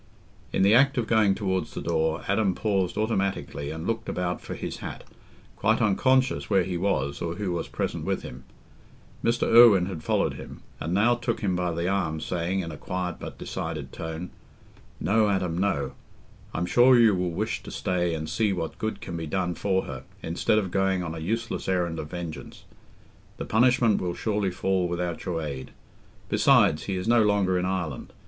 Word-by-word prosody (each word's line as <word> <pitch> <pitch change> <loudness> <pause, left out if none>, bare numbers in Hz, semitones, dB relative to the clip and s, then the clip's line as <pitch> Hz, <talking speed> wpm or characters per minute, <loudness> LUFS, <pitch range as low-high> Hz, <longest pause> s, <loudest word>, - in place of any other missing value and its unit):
In 95 - +2
the 100 +2 +5
act 135 +3 +5
of 120 - +1
going 110 -3 +3
towards 95 -3 -2
the - - -3
door, 80 -1 0
Adam 100 -2 +2
paused 95 -4 0
automatically 100 -9 -1
and 80 +1 -5
looked 115 +1 -2
about 90 -1 -2
for - - -6
his - - -5
hat, - - -7 0.5
quite 110 +2 +2
unconscious 130 +5 +2
where 95 - +4
he 90 0 -3
was 85 -7 -1
or 85 0 -2
who 100 -2 -2
was 85 -1 -2
present - - -3
with - - -2
him. 65 +1 -9 0.8
Mr. 115 +1 +1
Irwine 115 -6 +7
had 90 -4 -5
followed - - +1
him, - - -10 0.2
and 80 - -3
now 115 +5 +4
took 120 -1 -2
him 95 -3 0
by 90 -1 0
the 85 +1 -2
arm, 90 -5 0
saying, 90 +3 -1
in 85 -2 -5
a 75 - -8
quiet 90 0 -3
but - - -8
decided - - -5
tone, 80 +2 -6 0.7
"No, 105 +4 +2
Adam, 95 -4 0
no; 85 -8 0 0.6
I'm 85 - -2
sure 125 +7 +6
you 115 -3 +6
will 90 -1 0
wish 85 - -2
to - - -10
stay 90 -2 -1
and 80 0 -4
see 105 +6 +1
what 85 -4 -4
good 110 0 -3
can 85 - -6
be 80 -1 -4
done 90 +2 -1
for 95 +2 0
her, - - -7 0.2
instead 85 +6 +1
of 95 -4 0
going 95 -1 +1
on 80 -2 -4
a 80 - -6
useless 115 +6 -2
errand 85 -3 0
of 75 - -6
vengeance. 85 -2 -7 0.7
The - - -4
punishment 115 -1 +3
will 90 -1 -2
surely 105 -3 0
fall 95 0 0
without 85 -1 -3
your 85 -4 -2
aid. 70 -3 -5 0.6
Besides, 75 - +4
he 100 - -2
is 90 +2 -3
no 120 0 +5
longer 100 -3 +2
in 90 - -1
Ireland. 90 -7 -3
95 Hz, 190 wpm, -26 LUFS, 85-105 Hz, 0.8 s, Irwine